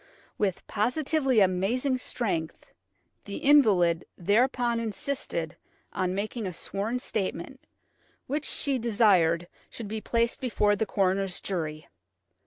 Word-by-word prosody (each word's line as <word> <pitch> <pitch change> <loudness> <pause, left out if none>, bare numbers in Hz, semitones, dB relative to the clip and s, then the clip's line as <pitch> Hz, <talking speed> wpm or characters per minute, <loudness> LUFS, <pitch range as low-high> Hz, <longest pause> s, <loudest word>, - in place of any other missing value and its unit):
With 195 -4 -1
positively 265 +2 +1
amazing 220 +8 +1
strength, 180 -11 -3 0.5
the 200 - -5
invalid 200 - +4
thereupon 235 +5 +2
insisted 215 - -3 0.4
on 185 0 -1
making 215 +2 -3
a 180 - -5
sworn 205 +7 -3
statement, 215 +1 -4 0.7
which 295 +3 -2
she 275 -3 +1
desired 195 -8 +3 0.2
should 230 - -7
be 215 +1 -4
placed 235 +1 0
before 210 -5 +2
the 220 +1 -1
coroner's 195 -1 0
jury. 155 -5 -4
210 Hz, 110 wpm, -27 LUFS, 185-245 Hz, 0.7 s, invalid